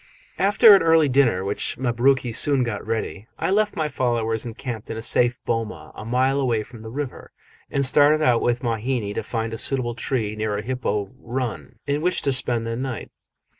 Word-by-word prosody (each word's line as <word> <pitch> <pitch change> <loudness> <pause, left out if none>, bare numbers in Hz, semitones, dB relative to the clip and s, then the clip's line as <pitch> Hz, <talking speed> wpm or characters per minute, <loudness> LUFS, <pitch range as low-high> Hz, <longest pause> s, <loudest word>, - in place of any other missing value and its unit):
After 205 +2 +7
an - - +3
early 165 -2 +4
dinner, 125 -8 +2
which 100 +1 -1
Mabruki 125 0 +1
soon 140 +2 +3
got 115 -4 -3
ready, 110 -1 -4
I - - -1
left 210 +1 +1
my 155 -1 0
followers 120 -4 -1
encamped 115 -1 -6
in 110 - -4
a - - -4
safe 120 +1 +3
boma 115 -2 -3
a - - -9
mile 130 +4 +1
away 120 -5 0
from 115 0 -13
the 110 - -8
river, 135 +2 -6 0.4
and 140 0 +1
started 145 +3 +5
out 120 -4 +3
with 120 +1 0
Mahina 115 -2 -2
to - - -2
find 115 -1 -4
a 115 - -5
suitable 130 -3 -2
tree, 115 -3 -2
near 105 -1 -2
a 105 - -4
hippo 105 -6 -2
"run", 120 0 -5
in 145 +1 -1
which 180 +1 0
to 140 - +1
spend 120 -3 0
the 115 0 -3
night. 130 -1 -5
120 Hz, 195 wpm, -23 LUFS, 115-135 Hz, 0.4 s, After